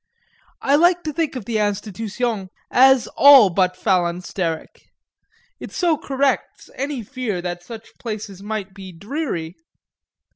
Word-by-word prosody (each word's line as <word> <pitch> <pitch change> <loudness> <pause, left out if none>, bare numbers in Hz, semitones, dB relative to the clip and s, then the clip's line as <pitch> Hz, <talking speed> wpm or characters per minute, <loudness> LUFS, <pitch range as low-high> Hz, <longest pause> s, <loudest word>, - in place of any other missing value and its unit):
I 280 +1 +4
like 350 +2 +3
to 305 - -4
think 320 -3 -1
of 245 -6 -6
the 225 -1 -1
Institution 210 0 -2 0.2
as 265 -1 +5
all 270 -9 +8
but 185 0 +1
phalansteric 175 -2 -2 0.8
it - - -8
so 345 -3 +1
corrects 275 -1 -2
any 275 -3 -4
fear 240 -5 -4
that 175 -1 -4
such 220 +5 -10
places 210 -4 -6
might 205 -2 -5
be 190 -1 -10
dreary. 185 - -5
215 Hz, 130 wpm, -21 LUFS, 190-270 Hz, 0.8 s, all